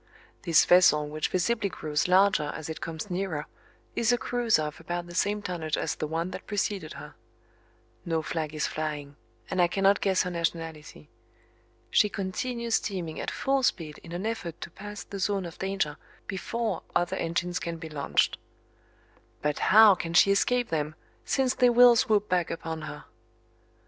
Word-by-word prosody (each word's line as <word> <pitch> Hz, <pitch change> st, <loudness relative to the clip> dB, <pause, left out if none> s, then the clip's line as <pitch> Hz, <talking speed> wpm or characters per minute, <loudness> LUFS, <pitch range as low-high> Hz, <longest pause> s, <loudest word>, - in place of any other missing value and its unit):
This 165 Hz, -3 st, +4 dB
vessel, 160 Hz, -4 st, +5 dB
which 155 Hz, +1 st, -2 dB
visibly 200 Hz, +3 st, 0 dB
grows 150 Hz, -3 st, -2 dB
larger 185 Hz, -5 st, +4 dB
as 160 Hz, 0 st, -6 dB
it 160 Hz, -, -6 dB
comes 165 Hz, +4 st, -5 dB
nearer, 175 Hz, -5 st, -2 dB, 0.5 s
is 235 Hz, 0 st, +2 dB
a 245 Hz, -, +3 dB
cruiser 235 Hz, -9 st, +1 dB
of 150 Hz, 0 st, -5 dB
about 175 Hz, +1 st, -4 dB
the 175 Hz, -, -11 dB
same 205 Hz, +3 st, 0 dB
tonnage 165 Hz, -5 st, -2 dB
as -, -, -1 dB
the 155 Hz, -, -4 dB
one 165 Hz, +3 st, -2 dB
that -, -, -8 dB
preceded 200 Hz, -5 st, -2 dB
her. -, -, -10 dB, 0.9 s
No 165 Hz, -2 st, -1 dB
flag 155 Hz, -1 st, -3 dB
is 150 Hz, -, 0 dB
flying 150 Hz, -2 st, -4 dB, 0.3 s
and 185 Hz, -, 0 dB
I 175 Hz, -, +5 dB
cannot 195 Hz, +2 st, +2 dB
guess 190 Hz, -2 st, +2 dB
her 180 Hz, -, -4 dB
nationality. 165 Hz, -, -4 dB, 0.8 s
She 210 Hz, -, +4 dB
continues 235 Hz, +4 st, -3 dB
steaming 175 Hz, -8 st, -1 dB
at -, -, -3 dB
full 270 Hz, 0 st, 0 dB
speed 165 Hz, -, -1 dB
in 170 Hz, -, -13 dB
an 175 Hz, +4 st, -4 dB
effort 220 Hz, -8 st, -4 dB
to -, -, -7 dB
pass 205 Hz, +3 st, -8 dB
the 200 Hz, -, -8 dB
zone 195 Hz, -1 st, 0 dB
of 170 Hz, -, -9 dB
danger 190 Hz, -6 st, -1 dB, 0.3 s
before 225 Hz, +4 st, -3 dB
other 175 Hz, 0 st, +1 dB
engines 170 Hz, +2 st, -1 dB
can 170 Hz, -1 st, -4 dB
be 165 Hz, 0 st, -8 dB
launched. 150 Hz, -3 st, 0 dB, 1.0 s
But 150 Hz, 0 st, 0 dB
how 215 Hz, 0 st, +9 dB
can 170 Hz, -2 st, -4 dB
she 200 Hz, -, +6 dB
escape 245 Hz, +4 st, +2 dB
them 155 Hz, -1 st, -2 dB, 0.3 s
since 265 Hz, -2 st, +1 dB
they 250 Hz, -, +4 dB
will 245 Hz, 0 st, +7 dB
swoop 210 Hz, -2 st, +2 dB
back 180 Hz, -2 st, +1 dB
upon 160 Hz, -1 st, -5 dB
her? 150 Hz, -2 st, -9 dB
175 Hz, 170 wpm, -28 LUFS, 160-205 Hz, 1.0 s, how